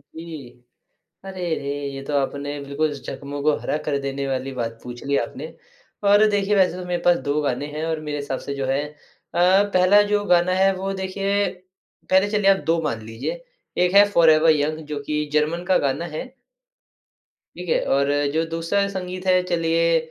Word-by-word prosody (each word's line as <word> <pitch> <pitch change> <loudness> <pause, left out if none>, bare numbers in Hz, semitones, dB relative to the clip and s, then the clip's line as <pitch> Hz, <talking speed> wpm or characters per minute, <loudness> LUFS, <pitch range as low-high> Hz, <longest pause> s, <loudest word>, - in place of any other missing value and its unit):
जी। 160 -6 -8 0.8
अरे 190 -1 -7
रे! 140 - -5 0.2
ये 135 - -6
तो 145 - -5
आपने 145 +1 -2
बिल्कुल 140 +2 -1
ज़ख्मों 140 +1 -7
को 150 -1 +3
हरा 150 - -2
कर 145 - +1
देने 140 0 -3
वाली 135 0 -2
बात 115 -1 -3
पूछ 120 -1 -8
ली 140 0 +1
आपने 135 +6 -4 0.6
और 205 +1 +6
देखिए 205 0 +1
वैसे 185 -2 +3
तो 180 - -6
मेरे 175 -1 -2
पास 175 -1 +5
2 145 +1 +1
गाने 140 -1 -1
हैं 155 +1 -4
और 160 -1 -2
मेरे 150 0 -2
हिसाब 140 -2 -4
से 140 - -5
जो 135 -1 -2
है 135 +1 0
अ, 180 +5 +1
पहला 185 +3 +6
जो 205 0 +2
गाना 180 0 +3
है 195 +1 +4
वो 190 +1 -3
देखिए 195 +1 0 0.6
पहले 190 +2 +4
चलिए 205 -2 +4
आप 195 - +3
2 165 0 +2
मान 130 -8 -2
लीजिए। - - -5 0.4
एक 180 +1 +1
है 205 +1 +9
Forever 160 -2 +6
Young 155 +2 -1
जो 150 -1 -4
कि 150 +1 -1
जर्मन 155 +3 +1
का 185 - +3
गाना 165 +6 -2
है। - - -4 1.3
ठीक - - -7
है? - - +3
और 140 0 +2 0.3
जो 160 +1 +1
दूसरा 165 +5 0
संगीत 185 -1 -6
है 185 0 +4
चलिए 165 0 +2
165 Hz, 190 wpm, -22 LUFS, 140-185 Hz, 1.3 s, है